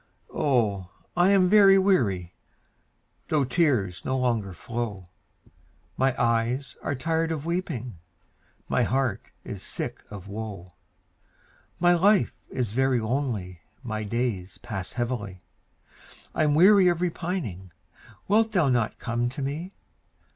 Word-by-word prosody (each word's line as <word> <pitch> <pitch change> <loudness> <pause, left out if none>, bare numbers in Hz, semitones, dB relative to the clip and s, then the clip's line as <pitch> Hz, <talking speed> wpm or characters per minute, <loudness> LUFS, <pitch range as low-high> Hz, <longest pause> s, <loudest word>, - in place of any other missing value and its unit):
Oh, 105 -10 +1 0.3
I 175 +2 +4
am 195 -2 +5
very 195 0 +7
weary, 110 - +1 0.9
Though 150 -3 +2
tears 125 - +1
no 130 - -1
longer 115 -6 0
flow; 105 0 -5 0.9
My 130 0 +1
eyes 120 +3 0
are 140 - -2
tired 160 +4 -1
of 155 -2 -3
weeping, 150 - -3 0.7
My - - +1
heart 130 0 0 0.2
is - - -7
sick - - -5
of 100 -2 -9
woe; 100 -4 -7 1.1
My 175 +1 +5
life 195 +3 +3 0.2
is 120 -5 -3
very 130 0 +2
lonely 110 - -2 0.2
My 110 -3 -3
days 105 -4 -2
pass 95 -4 -6
heavily, 120 -6 -3 1.0
I'm 150 -2 +2
weary 190 +3 +7
of 175 -2 +2
repining; 165 - -3 0.6
Wilt 220 +2 +3
thou 175 -8 +3
not 120 -3 0
come 120 +1 -1
to 135 +3 -7
me? 155 +7 -4
125 Hz, 120 wpm, -26 LUFS, 105-165 Hz, 1.1 s, very